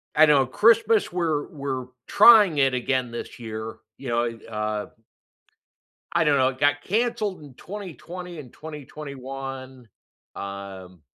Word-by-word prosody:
I 155 - +8
know 145 -3 +4
Christmas, 225 - +3
we're 165 -4 -1
we're 135 -3 -4 0.2
trying 210 -9 +7
it 135 -1 +3
again 125 0 -1
this 120 +1 -7
year, 110 -1 -6 0.2
you 135 - -7
know, 120 0 +1
it, 115 -2 -4
uh 105 -1 -3 1.3
I 170 -1 +3
don't 145 -2 +4
know, 130 0 +4
it 130 0 -8
got 145 0 +2
canceled 215 -4 -1
in 140 -3 -13
2020 180 -1 -8
and 130 -5 -11
2021, 135 -4 -8 0.5
um, 95 -3 -8
135 Hz, 135 wpm, -24 LUFS, 120-165 Hz, 1.3 s, I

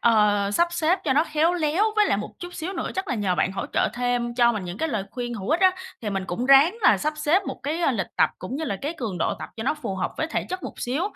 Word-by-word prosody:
ờ, 210 -3 +3
sắp 340 +12 +2
xếp 345 +2 +2
cho 270 - +2
nó 300 +4 +3
khéo 315 +3 +2
léo, 330 +4 +1
với 420 - +5
lại - - +2
một - - -5
chút 355 0 -8
xíu 345 +5 -4
nữa 335 - -3
chắc 380 +1 -3
là 250 - 0
nhờ 200 -4 0
bạn 190 - +1
hỗ - - -4
trợ - - +2
thêm 245 -1 -1
cho 240 -1 +4
mình 205 -4 -4
những 180 +4 -6
cái 320 - 0
lời 215 -8 -2
khuyên 240 -1 -4
hữu 195 -3 -6
ích 325 +4 +2
á, 375 - +7 0.3
thì 210 - -2
mình 195 -1 -2
cũng 235 +9 -2
ráng 280 +9 +6
là - - +5
sắp 305 +1 -1
xếp 305 +5 +2
một - - -5
cái, 315 +4 -2
a, 280 -6 +2
lịch 210 - -1
tập, - - +4
cũng 245 +9 -5
như 320 - -3
là 200 -7 -2
cái 295 +4 -2
cường 210 -8 -3
độ - - 0
tập - - -7
cho 220 - -4
nó 275 - +1
phù 300 -10 -5
hợp 185 - -1
với 315 - -1
thể 330 - -2
chất 370 -1 -4
một - - -6
xíu. 265 +8 -1
265 Hz, 305 wpm, -24 LUFS, 215-325 Hz, 0.3 s, á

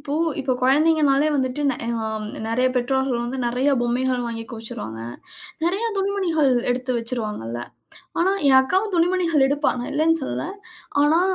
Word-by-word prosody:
இப்போ 285 +1 -4 0.3
இப்போ 260 -1 0
குழந்தைங்கன்னாலே 295 +1 +4
வந்துட்டு 260 +1 -1
நெ 260 - -3 0.3
அ, - - -2 0.4
நெறைய 250 +3 +2
பெற்றோர்கள் 250 -1 0
வந்து 250 +2 -4
நெறைய 250 +4 +1
பொம்மைகள் 245 +1 0
வாங்கி 230 -1 -5
குவிச்சிருவாங்க. 115 - -6 0.6
நெறைய 385 +7 +1
துணிமணிகள் 375 -7 +1 0.2
எடுத்து 255 +1 -2
வச்சிருவாங்க 230 - -2
இல்ல. 120 +1 -4 0.6
ஆனா 375 +3 +3 0.2
என் 265 -1 +7
அக்காவும் 380 +10 0
துணிமணிகள் 340 -4 +2
எடுப்பா. 285 +1 +1
நான் 245 - -4
இல்லன்னு 325 +2 +2
சொல்லல. 265 - -3 0.6
ஆனா 310 +4 +4
270 Hz, 145 wpm, -22 LUFS, 245-320 Hz, 0.6 s, என்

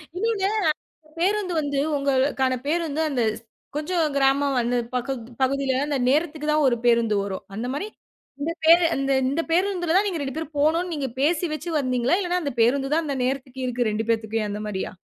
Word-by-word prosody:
இன்னொன்னு, 405 0 0 0.7
பேருந்து 385 +1 +1
வந்து 285 -2 -1 0.2
உங்களுக்கான 265 -1 +1
பேருந்து, 320 -1 0
அந்த 265 -4 0 0.5
கொஞ்சம் 320 +2 0
கிராமம் 275 0 +2
அந்த 240 +1 0 0.2
பக்கம் 250 0 -2 0.2
பகுதியில 270 0 +1
அந்த 290 -2 0
நேரத்துக்கு 305 +1 0
தான் 300 -1 +3
ஒரு 245 - +3
பேருந்து 230 -2 +3
வரும். 195 -1 -5
அந்த 230 +4 -3
மாரி 340 +9 -3 0.5
இந்த 315 +3 -1
பே 320 +1 +9 0.2
இந்த 275 0 +1 0.2
இந்த 290 +5 0
பேருந்துல 355 -1 +1
தான் 395 +2 +4
நீங்க 380 -4 -1
2 270 -2 -4
பேரும் 320 -1 -5
போனும்ன்னு 330 +4 +2
நீங்க 285 -3 -2
பேசி 320 +4 +2
வச்சி 310 +3 -5
வந்தீங்களா? 255 +2 +1
இல்லன்னா 360 -2 0
அந்த 285 -3 -2
பேருந்து 270 +4 +2
தான் 330 +2 +2
அந்த 280 -2 -2
நேரத்துக்கு 260 0 -3
இருக்கு 245 -1 -1
2 215 +1 -1
பேத்துகும், 220 -1 0
அந்த 205 - -4
மாரியா? 190 -2 -3
280 Hz, 175 wpm, -24 LUFS, 255-330 Hz, 0.7 s, பே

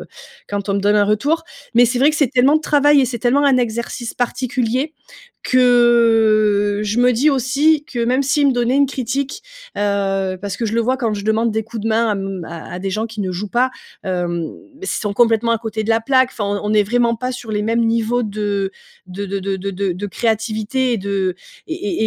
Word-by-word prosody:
heu, - - -9 0.4
quand 200 0 -4
on 200 - +1
me - - +1
donne 205 +1 +2
un 205 -1 +4
retour. 280 +11 +1 0.3
Mais 240 0 +6
c'est 245 +1 -1
vrai 285 +4 +5
que 305 - -3
c'est 285 -5 +2
tellement 265 +3 +4
de - - -1
travail 290 -1 +4
et 265 - +3
c'est 240 -1 -4
tellement 260 +5 +2
un 275 -2 +4
exercice 235 0 -3
particulier 250 +3 -1 0.5
que, 225 -4 +3
je 215 +3 -1
me 250 0 +4
dis 265 +7 +2
aussi 280 +4 +2
que, 245 - -7
même 255 +3 +1
s'ils 280 +2 +2
me - - +3
donnaient 245 +1 +1
une 280 0 +4
critique, 265 +2 -3 0.3
heu 195 -2 -1
parce 200 -1 -4
que 235 - -3
je 215 - -3
le 230 - +2
vois 255 +3 +1
quand 230 -5 -1
je 200 0 -6
demande 220 +1 +1
des 220 +1 -1
coups 225 -1 -7
de 225 - -1
main 230 +1 +2
à 215 - +2
m 195 -3 -4
à 170 +2 -7
des 195 - -3
gens 220 +4 -2
qui 220 -1 -7
ne 190 -2 -2
jouent 195 +3 -4
pas, 250 +4 +1 0.3
hem, 175 -3 -2 0.3
ils 390 - -6
sont 205 -2 -2
complètement 230 +1 +2
à 230 - 0
côté 220 -1 -4
de - - -7
la 225 - +3
plaque 260 +2 +2
enfin 210 - -4
on 205 0 -2
on 210 - -1
n'est 210 -1 +4
vraiment 235 +3 +1
pas 255 +2 -3
sur 245 -2 -7
les 210 -1 -1
mêmes 230 +2 +1
niveaux 230 +2 +1
de 205 -2 -2 0.4
de 195 +2 -6
de 200 +1 -3 0.2
de 195 +1 -4
de 195 0 -3
créativité 220 +4 -1
et - - +1
de 195 -2 -1 0.3
et 220 - -2
225 Hz, 225 wpm, -18 LUFS, 205-250 Hz, 0.5 s, Mais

